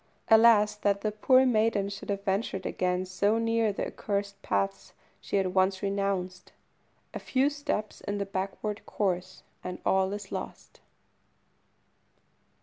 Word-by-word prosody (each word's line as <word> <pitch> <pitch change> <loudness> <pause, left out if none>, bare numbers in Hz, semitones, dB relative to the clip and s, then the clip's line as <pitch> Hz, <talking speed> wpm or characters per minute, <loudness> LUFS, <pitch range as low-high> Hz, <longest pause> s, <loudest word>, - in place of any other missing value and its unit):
Alas! 220 -2 +6
that 200 -1 0
the 215 - -1
poor 255 +5 +4
maiden 215 -4 +2
should 200 +1 -8
have 200 -1 -2
ventured 195 -1 -1
again 180 0 -1
so 200 +4 +1
near 230 -1 +1
the 200 - -3
accursed 200 -1 -3
paths 100 0 -2 0.3
she - - -5
had 190 -2 +1
once 190 +1 +2
renounced. 195 -2 -2 0.6
A - - -4
few 270 +2 +1
steps 280 -7 -3
in 205 0 -3
the 200 - -2
backward 195 +2 -4
course, 185 -2 -2 0.2
and 180 0 -5
all 190 0 +2
is 205 -1 -6
lost! - - -7
200 Hz, 140 wpm, -28 LUFS, 190-215 Hz, 0.6 s, Alas